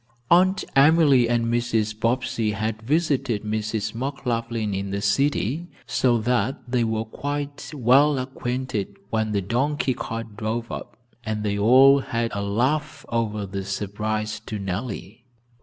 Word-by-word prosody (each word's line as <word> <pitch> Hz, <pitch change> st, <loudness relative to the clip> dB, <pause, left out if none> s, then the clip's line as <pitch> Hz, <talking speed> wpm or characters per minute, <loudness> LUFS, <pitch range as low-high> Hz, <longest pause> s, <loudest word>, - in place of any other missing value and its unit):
Aunt 185 Hz, +2 st, +5 dB
Emily 140 Hz, -4 st, +5 dB
and 120 Hz, -1 st, +1 dB
Mrs. 115 Hz, -2 st, 0 dB
Bobbsey 115 Hz, -2 st, 0 dB
had 110 Hz, +1 st, -3 dB
visited 135 Hz, -4 st, 0 dB
Mrs. 110 Hz, 0 st, -2 dB
McLaughlin 115 Hz, -4 st, -2 dB
in 100 Hz, +1 st, -3 dB
the 100 Hz, +1 st, -2 dB
city, 140 Hz, -, 0 dB, 0.2 s
so 120 Hz, -2 st, +2 dB
that 120 Hz, +3 st, 0 dB
they 120 Hz, -1 st, +1 dB
were 110 Hz, -1 st, -1 dB
quite 145 Hz, +4 st, -5 dB
well 140 Hz, +1 st, +4 dB
acquainted 125 Hz, -5 st, -3 dB
when 110 Hz, -1 st, 0 dB
the 100 Hz, -2 st, 0 dB
donkey 130 Hz, +6 st, 0 dB
cart 115 Hz, -2 st, -6 dB
drove 115 Hz, +2 st, -3 dB
up, -, -, -7 dB, 0.3 s
and 110 Hz, -2 st, -3 dB
they 100 Hz, -1 st, 0 dB
all 130 Hz, +6 st, +7 dB
had 115 Hz, -4 st, -2 dB
a 100 Hz, -, -2 dB
laugh 130 Hz, +9 st, -1 dB
over 110 Hz, -3 st, -1 dB
the 95 Hz, 0 st, -5 dB
surprise 105 Hz, +2 st, -3 dB
to 110 Hz, -, -6 dB
Nellie. 100 Hz, +3 st, -5 dB
115 Hz, 140 wpm, -24 LUFS, 105-130 Hz, 0.3 s, all